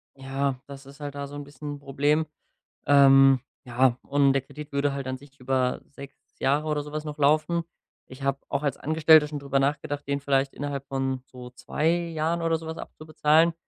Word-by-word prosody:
ja, 135 0 -2
das 140 -1 -11
ist 140 +1 -14
halt 145 -1 -6
da 140 0 -5
so 145 - -10
'n 145 - -6
bisschen 145 +1 -8
'n - - -12
Problem. 145 +3 +1 0.6
Ähm, 135 -1 +6 0.2
ja, 125 0 +2
und 140 -1 +3
der 135 - +1
Kredit 150 +2 -11
würde 140 0 +1
halt 140 -1 -5
an 130 0 -3
sich 140 0 -18
über 130 0 0
6 140 -1 -11 0.2
Jahre 145 +3 +1
oder 150 -1 0
so 150 0 -10
was 155 0 -4
noch 150 -1 -5
laufen. 155 +4 +2 0.5
Ich 130 +1 -12
hab 135 0 -1
auch 140 +1 -1
als 140 -3 -1
Angestellter 155 0 +5
schon 150 0 -5
drüber 140 -1 -1
nachgedacht, 145 +1 -1
den 140 0 -1
vielleicht 135 -1 +1
innerhalb 140 -1 -5
von 135 -1 -2
so 125 -1 -11
2 125 +5 -2
Jahren 170 -1 0
oder 165 0 +2
so 160 - -10
was 160 0 -5
abzubezahlen. 155 +1 +1
140 Hz, 200 wpm, -26 LUFS, 135-150 Hz, 0.6 s, Ähm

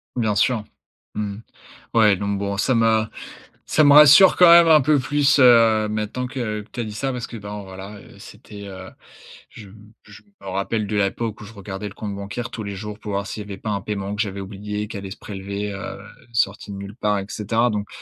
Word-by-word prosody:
Bien 110 -4 0
sûr, 110 +1 +1 0.5
mmh. 105 -1 -4 0.6
Ouais, 105 -3 +4
donc 100 +1 -2
bon, 100 0 -3
ça 125 +6 +1
m'a 110 -1 +2 0.6
ça 155 - +2
me 145 - +6
rassure 150 +6 +8
quand 180 -2 +7
même 170 0 +8
un 155 -1 +7
peu 150 +2 +3
plus, 145 +2 +2
heu, 115 -4 +5
maintenant 110 +4 -3
que 115 -5 -4
que 105 - -16
tu - - -8
as - - 0
dit 105 - -7
ça 135 +5 -2
parce 125 -1 -5
que 115 - -10
bon, 105 0 -7
voilà, 95 +2 -10
heu, - - -16
c'était, 105 -1 -12
heu 95 -1 -9 0.6
je 105 - -13
m 105 +2 -17
je 105 -1 -15 0.2
me 95 - -11
rappelle 100 +3 -2
de 110 - -3
l'époque 105 +2 -2
où - - -9
je 105 - -12
regardais 100 0 -7
le - - -13
compte 100 -1 -6
bancaire 100 +4 -6
tous 110 - -6
les 100 -1 -5
jours 105 +1 -7
pour 105 - -7
voir 100 0 -2
s'il 105 - -6
y - - -15
avait 100 -1 -8
pas 110 - -6
un 100 - -2
paiement 100 0 -4
que 105 - -1
j'avais 100 -3 -4
oublié, 105 +2 -5
qui 110 - -9
allait 95 -1 -7
se - - -8
prélever, 100 +1 -6
heu, 95 - -7 0.4
sorti 105 -2 -1
de 100 - -7
nulle 100 +1 -8
part 105 -4 0
et 95 - -6
cetera. 115 +4 0
Donc, 105 -2 -3
105 Hz, 235 wpm, -22 LUFS, 100-115 Hz, 0.6 s, rassure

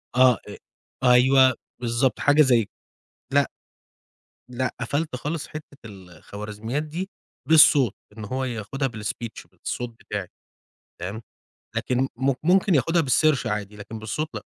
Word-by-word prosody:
آه، 130 -2 +6 0.7
أ 125 - +6
أيوه 130 +1 +6 0.3
بالضبط، 120 +1 +1
حاجة 145 +1 +5
زي 120 -6 +4 0.7
لأ، - - +3 1.0
لأ، 125 0 -2
قفَلت 145 +3 -2
خالص 150 +4 -4
حِتّة 155 - -7 0.2
ال 95 -4 -12
الخوارزميات 105 - -5
دي 170 +6 -5 0.4
بالصوت، 145 -7 +6 0.2
إن 110 - -6
هو 130 +5 -2
ياخدها 125 +3 -3
بالspeech، 110 0 -6
بالصوت 120 -1 -5
بتاعي، 100 -3 -5 0.7
فاهم؟ 95 +6 -5 0.6
لكن 130 +1 0
م 135 +2 +2
ممكن 185 +2 +3
ياخدها 165 +5 +3
بالسيرش 145 -2 +2
عادي، 105 -1 -3
لكن 105 +2 -8
بالصوت 110 +8 -3
لأ. - - -5
125 Hz, 130 wpm, -24 LUFS, 110-145 Hz, 1.0 s, آه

